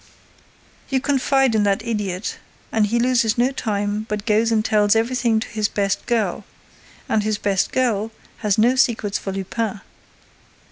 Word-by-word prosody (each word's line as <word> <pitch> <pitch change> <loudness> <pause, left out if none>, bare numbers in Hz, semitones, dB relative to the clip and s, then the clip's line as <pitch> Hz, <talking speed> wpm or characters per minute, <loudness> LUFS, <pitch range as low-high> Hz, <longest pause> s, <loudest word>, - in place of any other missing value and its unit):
You 270 - +1
confide 270 -2 +2
in 215 - +2
that 200 +3 0
idiot 205 -4 -3 0.3
and 220 -2 +2
he 235 +3 0
loses 235 -2 +2
no 245 +3 +2
time, 210 -3 -2
but 210 0 -3
goes 225 +1 +2
and 220 -1 +1
tells 210 0 +3
everything 230 0 +1
to - - -5
his 215 -2 0
best 200 -1 -2
girl. 230 -3 0 0.6
And 220 - +1
his 215 0 -1
best 200 -2 0
girl 225 -4 0 0.3
has 210 -1 0
no 240 +4 +4
secrets 225 -6 +1
for 195 - -5
Lupin. 195 +2 -3
220 Hz, 155 wpm, -21 LUFS, 205-235 Hz, 0.6 s, no